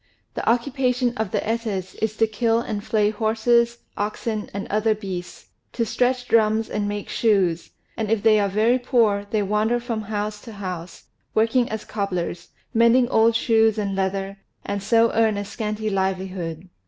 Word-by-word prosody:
The - - -1
occupation 250 0 +1
of 220 -3 -2
the - - -1
Etas 220 -5 -2
is 220 0 -1
to 225 - +4
kill 225 +1 +1
and 215 -3 -4
flay 210 -1 +1
horses, 235 +2 +2 0.2
oxen, 210 +1 -3
and 200 0 -5
other 215 +1 +1
beasts, 180 - -7 0.2
to 230 - 0
stretch 250 +2 0
drums 220 -1 +2
and 205 -1 -1
make 205 -1 -4
shoes; 190 -7 +1 0.3
and 220 -2 -3
if 220 -2 +1
they 215 -1 +5
are 200 -1 +1
very 220 +6 +2
poor, 225 -5 +2
they 210 -1 +1
wander 215 +4 +1
from 235 -2 -3
house 210 0 -4
to 230 - -10
house, 180 -4 -7 0.3
working 230 +3 +2
as 220 0 -5
cobblers, 180 -4 -3 0.2
mending 235 +2 +4
old 225 -1 +4
shoes 225 -1 +3
and 200 -2 -1
leather, 195 +1 -2 0.3
and 200 0 -3
so 230 +3 +3
earn 220 -2 +2
a 205 - -3
scanty 215 +1 -4
livelihood. 185 -3 -2
215 Hz, 165 wpm, -23 LUFS, 200-230 Hz, 0.3 s, they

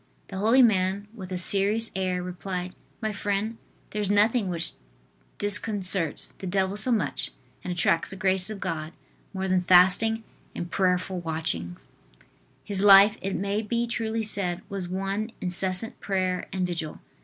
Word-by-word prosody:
The 190 - -7
holy 230 +6 +5
man, 200 -2 +1
with 190 -5 -10
a 185 - -2
serious 200 +5 +4
air, 185 -1 -1
replied: 180 0 -5 0.3
"My 215 -1 -1
friend, 205 +3 -3 0.3
there 210 - -3
is 200 - -2
nothing 205 0 +2
which 170 -1 -1 0.7
disconcerts 200 -5 +1
the 190 - -6
devil 190 +1 0
so 215 +5 +1
much, 225 - +1 0.3
and 180 - -4
attracts 170 -1 +1
the - - -8
graces 190 0 +1
of 215 -2 -6
God, 155 -2 -4 0.4
more 190 -1 -4
than 185 -1 +2
fasting 185 +5 +4 0.3
and 175 +1 -6
prayerful 185 0 0
watchings." 155 - -4 0.8
His 200 -2 -1
life, 200 +1 +7
it 195 0 -3
may 200 +2 -1
be 235 +2 -1
truly 225 -1 -3
said, 190 -4 +1
was 195 -3 -5
one 195 +4 -3
incessant 185 +4 -1
prayer 185 -2 -2
and 185 -1 -1
vigil. 165 -3 -5
190 Hz, 155 wpm, -26 LUFS, 180-210 Hz, 0.8 s, life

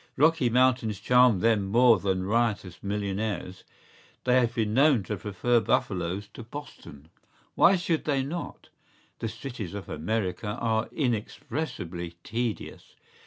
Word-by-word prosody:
¬Ý - - -28 0.2
Rocky 160 -6 +4
Mountains 125 -4 +2
charm 125 -3 +4
them 110 -4 +2
more 115 +1 +5
than 95 -1 -1
riotous 105 -3 -1
millionaires; 100 -2 -3 0.6
they 125 0 +4
have 120 -2 0
been 110 -2 0
known 135 -3 +4
to 105 - -3
prefer 105 +5 +1
buffaloes 95 -2 -1
to - - -9
Boston.¬Ý 85 - -10 0.4
Why 190 - +5
should 170 -3 -1
they 140 -3 +1
not?¬Ý 165 +6 -6 0.5
The 115 - -2
cities 110 -4 -7
of 100 - -7
America 105 +4 -2
are 110 -1 0
inexpressibly 105 - -3
tedious. 115 0 -4
110 Hz, 130 wpm, -27 LUFS, 100-125 Hz, 0.6 s, more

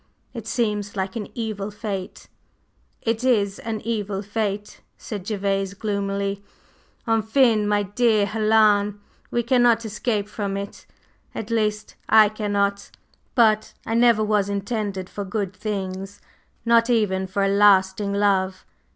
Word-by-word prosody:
It 230 -4 -7
seems 210 -4 -1
like 190 +1 -3
an 215 -3 -4
evil 215 -3 -3
fate." 205 -3 -6 0.8
"It 225 +1 -1
is 205 -6 +2
an 220 -2 -4
evil 205 -3 -3
fate," 205 0 -3 0.2
said 205 -4 -7
Gervase 195 -2 -1
gloomily. 200 -1 -2 0.6
"Enfin, 225 0 +3
my 205 0 +2
dear 210 +1 +2
Helen, 210 -1 +3 0.3
we 240 - 0
cannot 235 -1 +3
escape 210 -1 -2
from 200 -2 -3
it, 200 0 -7 0.5
at 220 +1 -5
least, 215 -1 -1
I 220 -1 +7
cannot. 200 -2 -1 0.5
But 215 -3 +3
I 225 - -2
never 235 -2 +4
was 210 -2 +1
intended 200 -2 -3
for 205 - -6
good 195 -1 -3
things, 195 -1 -5 0.5
not 230 0 +4
even 195 -5 +1
for 195 +2 -1
a - - +3
lasting 200 0 +4
love. 195 -2 +1
205 Hz, 130 wpm, -23 LUFS, 200-220 Hz, 0.8 s, I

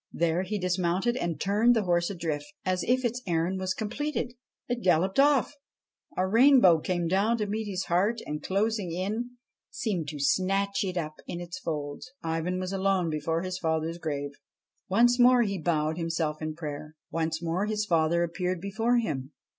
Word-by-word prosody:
There 170 +1 +1
he 200 +3 -2
dismounted 185 +4 0
and 170 -10 -2
turned 215 +5 +3
the 220 - +2
horse 175 -2 +1
adrift. 160 -6 -3 0.2
As 185 -1 +1
if 255 +1 +1
its 240 +1 -1
errand 175 +2 0
was 185 0 -1
completed, 245 +3 -3 0.3
it 245 -1 -2
galloped 185 +4 +2
off; 285 -1 +4 0.6
a 185 - +2
rainbow 230 - +6
came 175 +1 -1
down 200 +6 +2
to 210 - -1
meet 215 +1 -3
it, 195 +3 0
and, 150 0 -4
closing 205 -1 0
in, 215 +8 -3 0.3
seemed 185 -9 -2
to 145 0 -5
snatch 195 +7 +1
it 185 -2 -3
up 155 -2 -3
in 175 - -4
its 175 +1 -7
folds. 150 +5 -4
Ivan 165 +3 -1
was 185 +1 -3
alone 190 -3 +1
before 160 +3 -1
his 185 0 -4
father's 160 0 -1
grave. 145 -3 -3 0.6
Once 240 +5 +4
more 245 0 +6
he 200 -3 -2
bowed 155 0 0
himself 165 -2 -2
in 155 0 -3
prayer. 150 -1 -6 0.2
Once 160 0 -1
more 175 +5 0
his 210 -1 -1
father 170 -2 +2
appeared 180 +1 -2
before 225 +6 +1
him. 145 - -2
185 Hz, 170 wpm, -28 LUFS, 165-210 Hz, 0.6 s, rainbow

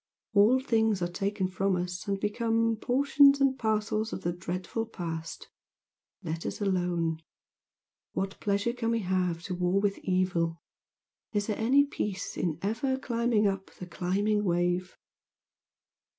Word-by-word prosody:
All 215 +5 +5
things 220 -7 +1
are - - +1
taken 195 +1 -1
from 190 +1 0
us 180 +1 -4
and 200 -1 -1
become 225 +2 +1
Portions 280 +3 +4
and 275 -1 +3
parcels 215 0 0
of - - -5
the 175 - 0
dreadful 185 +5 -4
Past, 165 -6 -6 0.8
Let 165 +1 -4
us - - -4
alone. 175 -5 0 0.9
What 195 0 -3
pleasure 200 +3 0
can 235 -2 -2
we 230 -1 +1
have 180 -3 0
To 180 - -4
war 180 +2 +1
with 200 -1 0
evil? 180 -3 0 0.8
Is 205 -1 +1
there 215 - -1
any 265 +6 +4
peace 205 -8 -4
In 165 -4 -1
ever 230 +6 0
climbing 235 -4 +1
up 195 -1 0
the 180 - -8
climbing 200 +4 0
wave?" 175 0 0
200 Hz, 140 wpm, -29 LUFS, 180-225 Hz, 0.9 s, All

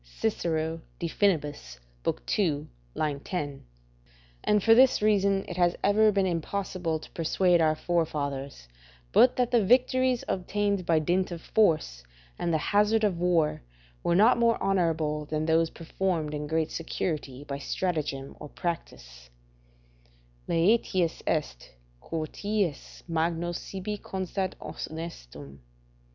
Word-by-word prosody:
Cicero, 160 - -2 0.2
De 170 - -3
Finib. 180 -4 +2 0.9
ii. 155 -7 +1 0.5
10.] 145 -4 -5 0.8
And 210 -2 +2
for 225 - +7
this 255 +2 +6
reason 200 -2 +2
it 175 - -6
has 175 -1 +3
ever 215 +2 +5
been 195 -1 +1
impossible 180 -1 -2
to 155 - -13
persuade 175 +1 +2
our 155 -1 +3
forefathers 140 - -2 0.4
but 250 - +6
that 250 -1 +1
the 235 -3 +4
victories 255 +3 +3
obtained 200 0 -1
by 165 - +4
dint 175 +4 +1
of 170 -2 -6
force 155 - +1 0.4
and 170 - 0
the 160 - +3
hazard 210 +6 +2
of 190 -5 +1
war 170 -3 +2 0.4
were 170 - +1
not 220 +6 +5
more 230 -1 +3
honourable 160 -5 0
than 155 +1 -2
those 165 0 +3
performed 165 -2 -2
in 150 0 -4
great 160 0 0
security 150 -5 -4
by 140 -1 -5
stratagem 145 -4 -3
or 150 - -9
practice: - - -6 1.2
"Laetius 180 -1 +2
est, - - -2 0.3
quoties 165 +1 -3
magno 165 +1 -1
sibi 195 +4 -5
constat 190 0 -3
honestum." 70 - -8
170 Hz, 120 wpm, -28 LUFS, 155-200 Hz, 1.2 s, for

